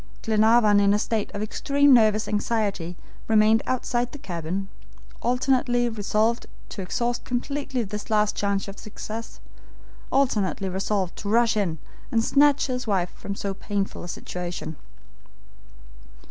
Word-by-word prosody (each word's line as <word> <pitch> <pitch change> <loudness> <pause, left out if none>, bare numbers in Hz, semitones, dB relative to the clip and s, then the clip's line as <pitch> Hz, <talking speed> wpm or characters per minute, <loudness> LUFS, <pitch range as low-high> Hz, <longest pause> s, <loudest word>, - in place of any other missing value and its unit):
Glenarvan 220 -1 +4
in 200 0 +4
a - - +3
state 215 0 -1
of 205 - -2
extreme 280 +5 +3
nervous 220 -2 +4
anxiety, 205 -5 -1 0.3
remained 220 0 +5
outside 245 -1 -1
the - - -8
cabin, 180 - -4 0.5
alternately 245 0 +2
resolved 220 +2 0 0.2
to 200 - -6
exhaust 235 +6 -2
completely 260 0 -2
this 210 +1 -6
last 210 -1 +2
chance 200 -1 -1
of 195 - -8
success, 220 +1 -7 0.7
alternately 210 -8 +1
resolved 190 0 -1
to 200 - -5
rush 230 +1 +3
in 185 -6 0 0.3
and 225 -1 +2
snatch 285 +2 +4
his 250 -2 -3
wife 185 -4 0
from 200 - -6
so 200 -1 -3
painful 200 0 -3
a - - -6
situation. 175 -2 -5
215 Hz, 130 wpm, -25 LUFS, 200-240 Hz, 0.7 s, remained